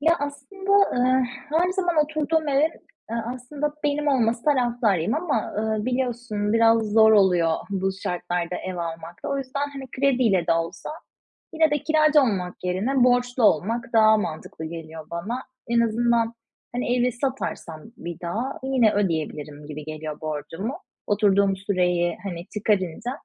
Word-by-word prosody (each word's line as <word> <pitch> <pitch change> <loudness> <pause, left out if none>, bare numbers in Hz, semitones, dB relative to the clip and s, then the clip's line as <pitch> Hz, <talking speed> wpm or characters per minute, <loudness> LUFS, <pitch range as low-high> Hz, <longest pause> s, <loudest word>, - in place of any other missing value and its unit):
Ya 330 +3 +4
aslında, 290 +8 -4 0.2
eee, 255 +1 +3 0.3
her 340 +4 +2
zaman 355 -3 0
oturduğum 310 +1 -1
evin, 285 +3 +3 0.4
eee, 230 - -2 0.2
aslında 290 +4 -4
benim 295 0 +1
olması 235 -3 +1
taraftarıyım 240 - +2
ama, 310 -9 -1
eee, 220 -1 -1
biliyorsun 240 -5 -1
biraz 230 0 +5
zor 220 +1 +5
oluyor 180 -5 +4
bu 195 -1 0
şartlarda 175 0 -2
ev 185 -1 -5
almak 165 0 -6
da - - -2
o 275 - -1
yüzden. 280 +2 -3
Hani, 275 -1 -7
krediyle 245 -10 +2
de 170 - +4
olsa 165 - -3 0.6
yine 320 -1 +3
de 295 - +2
kiracı 310 -1 +4
olmak 190 -7 -1
yerine 230 +9 +1
borçlu 245 0 +2
olmak 230 +4 +2
daha 220 -1 +6
mantıklı 160 -4 -5
geliyor 160 -1 -8
bana. 215 +10 -4 0.3
En 235 0 +3
azından, 235 0 +1 0.4
hani, 245 0 0
evi 250 0 +2
satarsam 245 - -4
bir 170 0 -7
daha 220 +10 -3
yine 260 -5 +3
ödeyebilirim 155 -6 -2
gibi 150 0 -7
geliyor 155 0 -6
borcumu. 165 - -4 0.3
Oturduğum 200 -1 +3
süreyi, 180 -3 0
hani, 175 -3 -5
çıkarınca 205 0 0
225 Hz, 145 wpm, -24 LUFS, 180-265 Hz, 0.6 s, daha